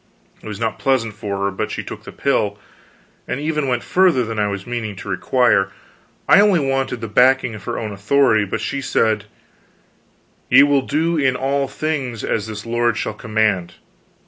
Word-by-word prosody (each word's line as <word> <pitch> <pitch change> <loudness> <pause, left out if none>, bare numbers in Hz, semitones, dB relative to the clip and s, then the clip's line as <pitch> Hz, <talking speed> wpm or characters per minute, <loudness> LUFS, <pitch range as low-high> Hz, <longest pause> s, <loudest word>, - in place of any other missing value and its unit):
It - - -11
was 105 -1 -6
not 115 -1 -2
pleasant 125 -5 +1
for 100 -1 -4
her, 100 - 0
but 95 - -3
she - - -4
took - - -9
the - - -8
pill; 100 -1 0 0.7
and 125 - -3
even 150 -1 -1
went 125 -2 -1
further 180 -10 +3
than 115 -1 -4
I 105 - +2
was 100 -1 -4
meaning 120 -4 -4
to - - -10
require. 120 -7 +2 0.6
I - - +7
only 205 -4 +4
wanted 135 -3 -1
the 115 - -4
backing 125 +2 +3
of 105 -1 -10
her 120 - -3
own 110 -2 -4
authority; 110 +2 +2
but 105 +3 -4
she 140 +5 -3
said: 110 -5 +1 1.2
"Ye - - +8
will 145 -1 +3
do 160 +5 0
in 130 -3 +2
all 135 +1 0
things 135 -7 -3
as 110 -1 -1
this 105 0 -7
lord 120 -1 0
shall - - -2
command. 110 -5 -1
120 Hz, 185 wpm, -20 LUFS, 105-135 Hz, 1.2 s, Ye